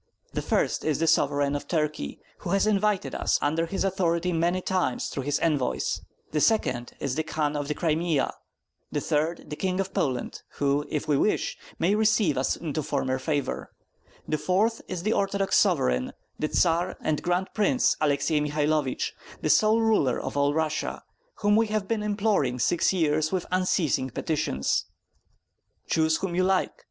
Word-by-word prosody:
The -, -, -1 dB
first -, -, 0 dB
is 155 Hz, -3 st, +1 dB
the 165 Hz, -, +1 dB
Sovereign 145 Hz, -2 st, +2 dB
of 145 Hz, -, -5 dB
Turkey, 150 Hz, -, -2 dB, 0.2 s
who -, -, -6 dB
has 195 Hz, +3 st, +2 dB
invited 210 Hz, -1 st, +1 dB
us -, -, +1 dB
under 160 Hz, +3 st, 0 dB
his 195 Hz, +3 st, -2 dB
authority 180 Hz, -2 st, 0 dB
many 170 Hz, +2 st, +1 dB
times 185 Hz, -8 st, -1 dB
through 140 Hz, -, -4 dB
his 145 Hz, +2 st, 0 dB
envoys; 145 Hz, -6 st, 0 dB, 0.3 s
the 150 Hz, -, 0 dB
second 125 Hz, -, +1 dB
is 140 Hz, -3 st, -2 dB
the 160 Hz, -, 0 dB
Khan 155 Hz, -2 st, -1 dB
of 145 Hz, -1 st, -2 dB
the 150 Hz, -, -2 dB
Crimea; 160 Hz, -2 st, 0 dB, 0.6 s
the -, -, 0 dB
third 155 Hz, +1 st, -1 dB
the -, -, -2 dB
King 185 Hz, +3 st, -1 dB
of 195 Hz, 0 st, -2 dB
Poland, 130 Hz, -4 st, -2 dB
who, 145 Hz, +1 st, 0 dB
if 150 Hz, -, -2 dB
we 145 Hz, -2 st, +3 dB
wish, 210 Hz, -, +1 dB, 0.2 s
may 180 Hz, +5 st, +2 dB
receive 215 Hz, -7 st, +3 dB
us 130 Hz, -, +1 dB
into 155 Hz, -2 st, -3 dB
former 130 Hz, -2 st, -1 dB
favor; 145 Hz, 0 st, -2 dB, 0.6 s
the 155 Hz, -, -1 dB
fourth 200 Hz, +9 st, +1 dB
is 180 Hz, -2 st, -4 dB
the 215 Hz, +3 st, +2 dB
Orthodox 195 Hz, 0 st, 0 dB
sovereign, 65 Hz, 0 st, +2 dB, 0.3 s
the 155 Hz, -, 0 dB
Tsar 170 Hz, +2 st, +1 dB
and 155 Hz, -1 st, 0 dB
Grand 180 Hz, +2 st, 0 dB
Prince 215 Hz, +5 st, +2 dB
Alexai 150 Hz, +1 st, +2 dB
Mihailovich, 150 Hz, -2 st, 0 dB, 0.3 s
the -, -, +3 dB
sole 220 Hz, +1 st, +4 dB
ruler 215 Hz, -, +2 dB
of -, -, -5 dB
all 145 Hz, 0 st, +3 dB
Russia, 155 Hz, -1 st, -2 dB, 0.4 s
whom 205 Hz, 0 st, +4 dB
we 225 Hz, +1 st, +3 dB
have 210 Hz, -2 st, -2 dB
been 225 Hz, 0 st, 0 dB
imploring 205 Hz, -, +1 dB
six 165 Hz, +7 st, +2 dB
years 155 Hz, -4 st, +1 dB
with 185 Hz, -2 st, -1 dB
unceasing 180 Hz, -7 st, +1 dB
petitions. 120 Hz, -, -1 dB, 1.0 s
Choose 160 Hz, -1 st, +2 dB
whom 190 Hz, -3 st, -3 dB
you 185 Hz, +1 st, +2 dB
like. 190 Hz, 0 st, +2 dB
160 Hz, 170 wpm, -26 LUFS, 145-190 Hz, 1.0 s, sole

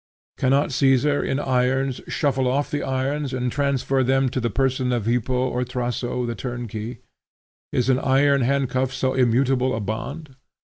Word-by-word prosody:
Cannot 135 Hz, +3 st, +2 dB
Caesar 135 Hz, +2 st, +3 dB
in 135 Hz, -, -1 dB
irons 130 Hz, 0 st, 0 dB
shuffle 135 Hz, -4 st, 0 dB
off 140 Hz, +3 st, 0 dB
the 145 Hz, -, -1 dB
irons 135 Hz, +1 st, -2 dB
and 125 Hz, -1 st, -1 dB
transfer 135 Hz, -1 st, 0 dB
them 135 Hz, +1 st, +2 dB
to 130 Hz, -, -2 dB
the 120 Hz, -1 st, -1 dB
person 130 Hz, +2 st, 0 dB
of 120 Hz, -4 st, -1 dB
Hippo 125 Hz, +2 st, 0 dB
or 125 Hz, 0 st, -1 dB
Thraso 125 Hz, 0 st, -2 dB
the 120 Hz, -, -2 dB
turnkey? 120 Hz, -2 st, -6 dB, 0.7 s
Is 125 Hz, -, 0 dB
an 130 Hz, -1 st, +3 dB
iron 140 Hz, +1 st, +3 dB
handcuff 130 Hz, 0 st, 0 dB
so 130 Hz, -1 st, -1 dB
immutable 130 Hz, +1 st, +2 dB
a -, -, -2 dB
bond? 135 Hz, -, -5 dB
130 Hz, 160 wpm, -23 LUFS, 125-135 Hz, 0.7 s, Caesar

